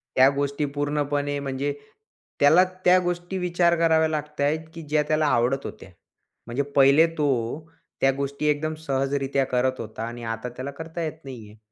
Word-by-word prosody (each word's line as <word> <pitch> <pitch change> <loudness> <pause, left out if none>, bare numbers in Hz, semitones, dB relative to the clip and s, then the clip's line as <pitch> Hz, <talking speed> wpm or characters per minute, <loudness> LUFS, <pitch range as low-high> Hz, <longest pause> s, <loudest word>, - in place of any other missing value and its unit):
त्या 130 +1 +7
गोष्टी 140 +1 -1
पूर्णपणे 145 0 -1
म्हणजे 140 +1 -2 0.7
त्याला 155 +6 +6 0.2
त्या 180 +1 +7
गोष्टी 175 +1 -3
विचार 175 -1 +2
कराव्या 160 -1 +4
लागत 150 -1 -4
आहेत, 145 +3 +2
की 165 - -8
ज्या 150 -1 0
त्याला 155 0 +2
आवडत 130 +1 +1
होत्या. - - -9 0.6
म्हणजे 125 +4 -1
पहिले 140 +3 +6
तो 150 -1 +1 0.7
त्या 135 - +5
गोष्टी 140 +2 -3
एकदम 150 +1 0
सहजरित्या 135 -2 -1
करत 130 0 0
होता 110 0 -6
आणि 120 0 -8
आता 115 +1 -4
त्याला 130 +3 -6
करता 165 +1 -6
येत 155 - -3
नाही 120 -6 -9
आहे. 105 - -17
145 Hz, 165 wpm, -24 LUFS, 135-155 Hz, 0.7 s, त्या